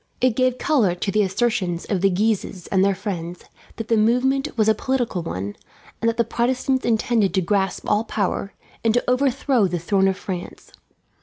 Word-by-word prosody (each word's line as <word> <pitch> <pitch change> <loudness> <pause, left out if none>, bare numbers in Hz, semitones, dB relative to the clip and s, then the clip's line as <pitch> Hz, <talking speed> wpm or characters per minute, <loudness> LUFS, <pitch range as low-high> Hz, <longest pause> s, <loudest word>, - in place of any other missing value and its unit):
It 250 -3 +2
gave 255 0 +1
colour 230 - +2
to 195 +3 -2
the 215 - +2
assertions 190 -3 0
of 195 -4 -1
the 195 - +4
Guises 195 -2 -1
and 190 -1 +3
their 200 0 +2
friends 180 -3 -5 0.3
that 225 -1 -6
the 230 - +2
movement 250 +5 +1
was 215 -1 +3
a 220 - +5
political 245 -4 -1
one, 100 - -5 0.5
and 230 - +3
that 230 - -3
the 235 - +3
Protestants 255 +3 0
intended 220 -4 +1
to 190 - +3
grasp 190 +1 -1
all 210 +1 +2
power, 200 -2 -2 0.3
and 225 0 +2
to 245 - 0
overthrow 255 -3 +2
the 175 0 -2
throne 190 +3 +1
of 190 -1 0
France. 185 -3 -7
215 Hz, 185 wpm, -22 LUFS, 190-240 Hz, 0.5 s, a